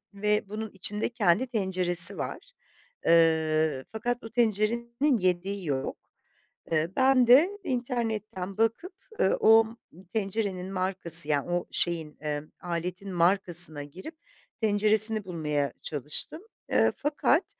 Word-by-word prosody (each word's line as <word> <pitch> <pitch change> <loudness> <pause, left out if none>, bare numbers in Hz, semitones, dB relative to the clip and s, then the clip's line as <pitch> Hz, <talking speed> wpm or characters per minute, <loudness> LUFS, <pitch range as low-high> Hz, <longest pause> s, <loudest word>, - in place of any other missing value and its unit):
ve 210 0 0
bunun 215 +1 -5
içinde 210 +2 -3
kendi 225 0 +1
tenceresi 185 -6 +2
var. - - -6 0.5
Iıı, 160 -4 +2
fakat 240 +2 -3
o 225 - -8
tencerenin 235 +4 0
yediği 185 +1 -1
yok. 135 -3 -3 0.7
Eee, 160 +1 +1
ben 260 -1 +4
de 275 +10 +6
internetten 225 - -3
bakıp, 230 - 0 0.3
eee, 190 - +3
o 225 0 +6 0.5
tencerenin 195 -3 -3
markası 180 -4 +2
yani 145 +2 0
o 175 0 -1
şeyin, 165 -3 -2
eee, 150 -1 -3 0.2
aletin 180 +2 -5
markasına 175 -3 +2
girip 185 - -11 0.4
tenceresini 215 0 +3
bulmaya 150 -5 -2
çalıştım. 150 - -3 0.3
Eee, - - +3
fakat, 295 +3 +1
195 Hz, 115 wpm, -27 LUFS, 170-225 Hz, 0.7 s, de